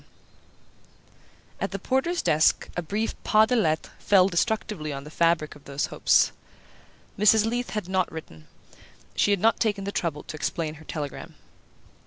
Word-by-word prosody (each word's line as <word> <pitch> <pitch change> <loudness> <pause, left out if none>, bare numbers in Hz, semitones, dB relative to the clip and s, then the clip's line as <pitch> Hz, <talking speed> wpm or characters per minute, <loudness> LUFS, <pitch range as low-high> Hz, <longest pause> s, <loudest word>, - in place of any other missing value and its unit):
V - - -26 1.5
At - - -1
the - - -4
porter's 300 +7 0
desk 155 +1 +3
a 175 - -1
brief 205 +7 -2
"Pas 215 0 +5
de 250 - 0
lettres" 160 -8 0
fell 190 -2 +4
destructively 195 -4 -1
on 140 -1 -6
the 150 - -11
fabric 165 -2 +1
of 145 - -17
these 140 +1 -2
hopes. - - +3 0.9
Mrs. 215 +1 +5
Leath 240 +2 -2
had 210 -4 -4
not 185 -1 0
written 80 - -10 0.7
she - - +2
had 200 -2 +2
not 225 +4 +3
taken 205 -3 0
the 200 - -3
trouble 160 -6 -2
to - - -8
explain 155 +1 -2
her - - -14
telegram. 145 -3 -6
180 Hz, 165 wpm, -26 LUFS, 155-215 Hz, 1.5 s, Pas